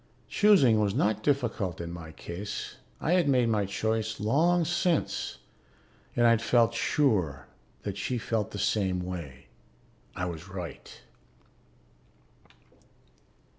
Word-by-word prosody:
Choosing 150 Hz, -, +5 dB
was 100 Hz, -2 st, +1 dB
not 105 Hz, 0 st, +1 dB
difficult 115 Hz, -, 0 dB
in 85 Hz, 0 st, -5 dB
my 85 Hz, -2 st, -8 dB
case. 100 Hz, +6 st, -6 dB, 0.2 s
I 160 Hz, -, -1 dB
had 175 Hz, -5 st, +3 dB
made 125 Hz, -3 st, +3 dB
my 105 Hz, -3 st, +1 dB
choice 110 Hz, +2 st, -1 dB
long 165 Hz, +10 st, +3 dB
since 175 Hz, 0 st, 0 dB, 0.8 s
and 120 Hz, -, +3 dB
I'd 115 Hz, -1 st, +5 dB
felt 115 Hz, -1 st, +3 dB
sure 95 Hz, -, +1 dB, 0.4 s
that 100 Hz, -1 st, -4 dB
she 125 Hz, +6 st, -1 dB
felt 110 Hz, -2 st, -1 dB
the -, -, -7 dB
same 95 Hz, -2 st, 0 dB
way; 85 Hz, -8 st, -7 dB, 0.7 s
I 90 Hz, -, -2 dB
was 85 Hz, +1 st, -6 dB
right. 90 Hz, -3 st, -8 dB
110 Hz, 120 wpm, -28 LUFS, 90-125 Hz, 0.8 s, Choosing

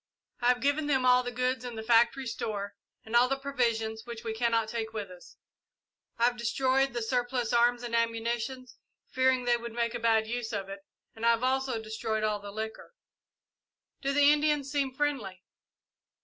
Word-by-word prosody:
I 240 Hz, -, 0 dB
have 245 Hz, 0 st, +3 dB
given 285 Hz, +2 st, +1 dB
them 265 Hz, -3 st, +2 dB
all 250 Hz, 0 st, +6 dB
the 245 Hz, -, -4 dB
goods 255 Hz, +1 st, -1 dB
in 245 Hz, -2 st, -6 dB
the 220 Hz, -, -5 dB
factory 235 Hz, +3 st, +3 dB
store, 205 Hz, -4 st, -4 dB, 0.3 s
and 220 Hz, +1 st, -4 dB
all 245 Hz, +1 st, +5 dB
the 270 Hz, -, 0 dB
provisions 230 Hz, -5 st, -1 dB
which 235 Hz, -1 st, -8 dB
we 225 Hz, -1 st, -3 dB
cannot 230 Hz, -1 st, +1 dB
take 225 Hz, 0 st, -4 dB
with 205 Hz, -4 st, -5 dB
us. 180 Hz, -1 st, -14 dB, 0.8 s
I 230 Hz, -, -1 dB
have 245 Hz, 0 st, +3 dB
destroyed 260 Hz, +3 st, +1 dB
the 240 Hz, -1 st, -2 dB
surplus 245 Hz, 0 st, -1 dB
arms 240 Hz, +1 st, +3 dB
and 235 Hz, -1 st, -3 dB
ammunition, 230 Hz, +2 st, -1 dB, 0.5 s
fearing 260 Hz, -1 st, +2 dB
they 240 Hz, 0 st, +3 dB
would 235 Hz, -1 st, -7 dB
make 235 Hz, 0 st, -1 dB
a -, -, -3 dB
bad 225 Hz, -1 st, +3 dB
use 235 Hz, 0 st, -4 dB
of 195 Hz, -2 st, -3 dB
it, 195 Hz, 0 st, -7 dB, 0.4 s
and 225 Hz, -, -10 dB
I 235 Hz, -, +5 dB
have 230 Hz, +1 st, +2 dB
also 260 Hz, -2 st, 0 dB
destroyed 220 Hz, 0 st, -3 dB
all 210 Hz, -1 st, 0 dB
the 205 Hz, 0 st, -9 dB
liquor." 220 Hz, -, -7 dB, 1.1 s
"Do 275 Hz, -, 0 dB
the 290 Hz, +1 st, +6 dB
Indians 295 Hz, -2 st, +1 dB
seem 280 Hz, -2 st, 0 dB
friendly?" 255 Hz, -10 st, -2 dB
235 Hz, 190 wpm, -29 LUFS, 220-260 Hz, 1.1 s, all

